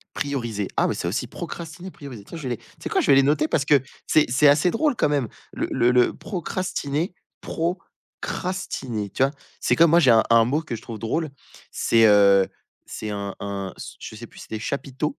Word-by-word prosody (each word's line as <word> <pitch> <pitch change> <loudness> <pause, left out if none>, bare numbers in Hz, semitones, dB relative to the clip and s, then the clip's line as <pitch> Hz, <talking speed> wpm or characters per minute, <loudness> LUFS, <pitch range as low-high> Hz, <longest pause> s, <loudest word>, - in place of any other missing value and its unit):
Prioriser. 120 -8 -2
Ah - - +3
ouais, - - -1
ça 85 - -3
aussi, 120 +6 -2
procrastiner, 175 +4 -7
prioriser. 125 -8 -10
Tiens, 165 - -9
je 150 - -8
vais 130 - -3
les - - -16
tu - - -24 0.2
sais - - -4
quoi, - - +2
je - - -2
vais - - +8
les 135 - +6
noter, 150 +2 +2
parce 140 -3 0
que 145 -2 +5 0.3
c'est 155 - +4
c'est 130 +4 +4
assez 145 +5 +4
drôle 295 +2 +1
quand 150 - +2
même. 140 -5 +1 0.3
Le - - -2
le 120 +1 +3
le 125 0 +4
procrastiner 175 -3 -3 0.3
procrastiner, 165 - -4
tu - - -4
vois? 135 - +2 0.3
C'est - - +2
comme 165 -1 +5
moi, 170 - +6
j'ai 135 -6 +4
un 110 -1 +6
un 115 -1 +7
mot 145 +6 0
que 120 - -4
je 110 - -9
trouve 115 -2 -7
drôle, 150 +9 -2 0.4
c'est, 115 -1 +4
heu, 100 -2 +6 0.4
c'est 105 -1 -5
un 100 -1 -4
un 100 -2 -4
se - - -9
je 110 - -8
sais 115 +2 -8
plus - - -16
si - - -9
c'était 110 - -4
chapiteaux? 140 +4 -3
135 Hz, 220 wpm, -24 LUFS, 110-155 Hz, 0.4 s, vais